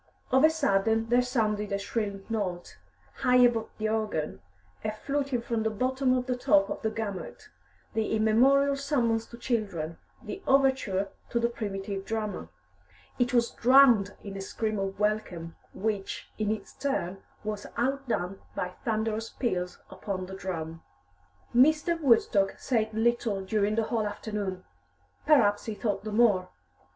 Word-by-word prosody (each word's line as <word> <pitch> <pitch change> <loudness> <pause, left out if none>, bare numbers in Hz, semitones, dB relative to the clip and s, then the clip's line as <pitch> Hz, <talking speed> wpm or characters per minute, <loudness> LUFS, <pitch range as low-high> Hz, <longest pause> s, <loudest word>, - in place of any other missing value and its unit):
Of 265 +2 +5
a 315 - +8
sudden 225 -7 +1
there 245 +1 +5
sounded 215 -5 0
a 200 - +1
shrill 200 0 -3
note, 185 - -3 0.4
high 250 - +3
above 240 -3 +4
the 215 - -1
organ, 215 - -2 0.4
a 215 - -1
fluting 275 +2 -2
from 230 -2 -1
the 220 - +1
bottom 255 +4 +1
to 255 - +1
the - - +2
top 200 -5 +3
of - - -4
the 220 - 0
gamut, 215 -3 -6 0.4
the 220 0 0
immemorial 265 +6 +4
summons 245 -5 0
to 235 - -11
children, 195 -10 -2 0.2
the 390 - -6
overture 265 -8 +2 0.2
to 235 - 0
the 235 0 +2
primitive 200 -3 -4
drama. 210 - -3 0.7
It 245 +1 +2
was 235 -1 +2
drowned 240 -5 +5
in 200 -1 -7
a 195 - -5
scream 215 +2 -2
of 195 0 -3
welcome, 200 -6 -1 0.2
which, 205 -1 -3
in 215 -1 0
its 215 0 -3
turn, 195 -9 -2 0.2
was 210 -1 -4
outdone 240 -7 -1
by 180 - -2
thunderous 220 0 -1
peals 180 -8 -2
upon 190 -3 -4
the 190 - -9
drum. 165 -4 -5 0.7
Mr. 310 +6 +4
Woodstock 225 -7 +3
said 220 -4 0
little 225 -2 +1
during 210 +1 +1
the 225 - +2
whole 220 -1 -1
afternoon. 205 -3 -4 0.6
Perhaps 210 -9 +4
he 220 - -4
thought 205 -2 -2
the 215 - -4
more. 210 -5 +3
220 Hz, 150 wpm, -28 LUFS, 200-245 Hz, 0.7 s, a